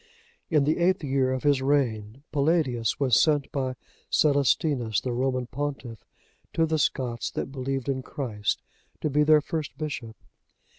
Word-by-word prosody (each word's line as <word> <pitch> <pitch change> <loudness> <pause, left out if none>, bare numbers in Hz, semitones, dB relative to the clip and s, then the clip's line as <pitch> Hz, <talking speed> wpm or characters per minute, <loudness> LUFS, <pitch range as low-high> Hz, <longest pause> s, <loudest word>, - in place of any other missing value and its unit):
In 150 -4 +3
the 155 +4 +1
eighth 180 0 +2
year 135 -2 +1
of 130 -1 -2
his 145 -2 +3
reign,(80) 130 -4 0
Palladius 140 - +1
was 130 -4 +4
sent 145 -3 +2
by 130 -2 -2 0.3
Celestinus, 140 - +2
the 125 - -3
Roman 130 0 0
pontiff, 130 -2 -5 0.5
to 165 - +3
the 160 -1 0
Scots 125 -4 -1
that - - -4
believed 135 0 -3
in 135 -1 -1
Christ, 115 -7 -3 0.4
to 155 - -1
be 150 +2 +3
their 150 0 +6
first 155 0 -4
bishop. 125 -8 -5
135 Hz, 150 wpm, -26 LUFS, 125-150 Hz, 0.5 s, their